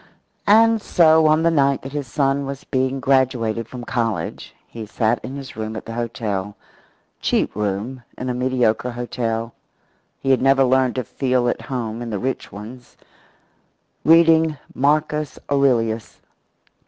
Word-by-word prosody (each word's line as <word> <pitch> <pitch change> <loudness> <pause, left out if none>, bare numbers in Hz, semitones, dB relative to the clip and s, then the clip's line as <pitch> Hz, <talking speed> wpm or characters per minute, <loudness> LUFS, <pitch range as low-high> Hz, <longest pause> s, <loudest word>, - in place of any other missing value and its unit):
And 225 +1 +5
so 160 -4 +4
on 155 +1 +3
the 170 - +3
night 140 -3 +2
that 135 - -7
his 145 -2 -4
son 135 +2 0
was 140 0 -6
being 130 +1 -1
graduated 125 -4 +1
from 125 0 -8
college 115 -3 -3
he 110 -2 -8
sat 115 +2 0
in 130 - -6
his 135 -2 -8
room 110 0 -5
at - - -7
the 115 - -7
hotel 110 -4 -3 0.6
cheap - - 0
room 105 +5 -3 0.2
in 130 - -5
a 125 - -1
mediocre 125 -2 0
hotel; 115 -1 -3 0.7
he 135 - 0
had 130 - +3
never 135 +1 +4
learned 130 -1 +2
to 130 - -1
feel 125 +1 0
at - - -1
home 120 -3 -4
in 120 - -5
the 105 - -2
rich 130 +6 -3
ones 115 +5 -11 1.1
reading 160 -1 +5 0.2
Marcus 150 +1 0
Aurelius. 115 -6 +1
130 Hz, 150 wpm, -21 LUFS, 115-140 Hz, 1.1 s, And